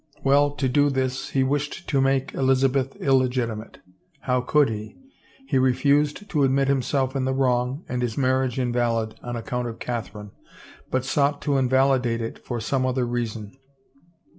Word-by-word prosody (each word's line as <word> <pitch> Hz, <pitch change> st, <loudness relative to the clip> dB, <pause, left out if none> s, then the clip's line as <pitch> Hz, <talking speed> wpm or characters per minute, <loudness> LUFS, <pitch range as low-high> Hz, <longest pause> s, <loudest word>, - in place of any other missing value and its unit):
Well, 140 Hz, +1 st, +4 dB
to 135 Hz, -, 0 dB
do 145 Hz, +3 st, +3 dB
this, 130 Hz, -1 st, -2 dB
he 135 Hz, -, +1 dB
wished 145 Hz, +6 st, -2 dB
to 135 Hz, -2 st, +2 dB
make 135 Hz, 0 st, +1 dB
Elizabeth 135 Hz, 0 st, +1 dB
illegitimate. 125 Hz, -5 st, 0 dB, 0.4 s
How 125 Hz, -1 st, 0 dB
could 145 Hz, +3 st, +3 dB
he? 110 Hz, -1 st, -6 dB, 0.5 s
He 135 Hz, -, +2 dB
refused 140 Hz, +7 st, +2 dB
to 150 Hz, -7 st, +1 dB
admit 135 Hz, 0 st, +2 dB
himself 135 Hz, 0 st, 0 dB
in 135 Hz, -1 st, 0 dB
the 130 Hz, 0 st, 0 dB
wrong 130 Hz, +2 st, 0 dB
and 125 Hz, 0 st, -3 dB
his 120 Hz, -3 st, -2 dB
marriage 130 Hz, -2 st, +1 dB
invalid 120 Hz, -3 st, 0 dB
on 120 Hz, 0 st, -5 dB
account 120 Hz, +1 st, -3 dB
of 115 Hz, -1 st, -6 dB
Catherine, 110 Hz, -4 st, -5 dB, 0.6 s
but 130 Hz, 0 st, -1 dB
sought 140 Hz, +1 st, +1 dB
to 145 Hz, -, +1 dB
invalidate 130 Hz, -2 st, +2 dB
it 115 Hz, 0 st, -5 dB
for 120 Hz, -2 st, -4 dB
some 130 Hz, +4 st, -1 dB
other 130 Hz, -1 st, 0 dB
reason. 115 Hz, -2 st, -4 dB
130 Hz, 160 wpm, -24 LUFS, 120-135 Hz, 0.6 s, Well